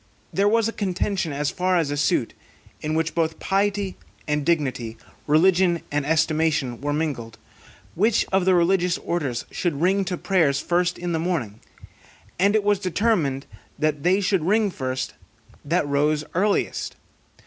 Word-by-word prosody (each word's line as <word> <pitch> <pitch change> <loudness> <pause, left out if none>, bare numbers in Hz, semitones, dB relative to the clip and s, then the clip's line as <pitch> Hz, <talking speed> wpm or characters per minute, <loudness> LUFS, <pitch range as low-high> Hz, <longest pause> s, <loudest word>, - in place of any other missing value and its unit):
There 200 +1 +2
was 225 0 +3
a 230 - -3
contention 190 -3 -1
as 145 +1 -1
far 185 0 +1
as 160 -4 0
a - - -1
suit 145 - +1 0.5
(in 155 +1 -2
which 160 0 0
both 160 -1 0
piety 195 0 0 0.3
and 150 -1 0
dignity, 130 -8 -1 0.3
religion 175 +2 +3
and 145 -1 -1
estimation, 155 -5 +1
were 145 +1 -1
mingled), 145 -7 -3 0.6
which 215 +5 +2
of 190 -1 +2
the 185 -1 +4
religious 175 0 +2
orders 140 -8 -3
should 165 -6 -2
ring 190 +4 +2
to 180 -1 -2
prayers 160 -9 +2
first 175 +3 0
in 175 0 -3
the 165 - 0
morning; 155 - -2 0.8
and 200 +3 +3
it 215 - +2
was 205 -1 +2
determined, 185 -8 0 0.3
that 150 -2 0
they 185 +5 +3
should 195 -3 +1
ring 210 +3 +2
first 130 -4 -3 0.5
that 160 +1 0
rose 150 +2 +1
earliest. 200 +3 0
170 Hz, 155 wpm, -23 LUFS, 150-190 Hz, 0.8 s, the